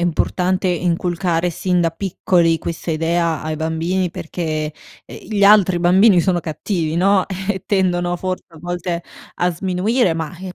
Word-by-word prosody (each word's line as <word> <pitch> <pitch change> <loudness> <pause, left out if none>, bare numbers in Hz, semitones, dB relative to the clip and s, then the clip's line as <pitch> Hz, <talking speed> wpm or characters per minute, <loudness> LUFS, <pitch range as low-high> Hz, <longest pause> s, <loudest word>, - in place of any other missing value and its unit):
importante 180 +2 0
inculcare 175 0 0
sin 180 +1 0
da 165 - +1
piccoli 170 -1 +1
questa 165 +2 -5
idea 165 0 0
ai 155 0 -3
bambini 165 +4 -1
perché, 155 -2 -4 0.3
ehm, - - -10
gli 205 -2 +2
altri 200 -3 +5
bambini 185 +2 +5
sono 180 -1 +1
cattivi, 160 0 -3
no, 190 +1 +3 0.2
e 190 -2 -1
tendono 175 -3 +1
forse, 185 +1 -4
a 165 -2 -16
volte, 175 +1 -4 0.3
a 180 - +1
sminuire 190 +3 +1
ma, 160 +1 -5
eh, 185 -1 -8
175 Hz, 150 wpm, -19 LUFS, 165-185 Hz, 0.3 s, altri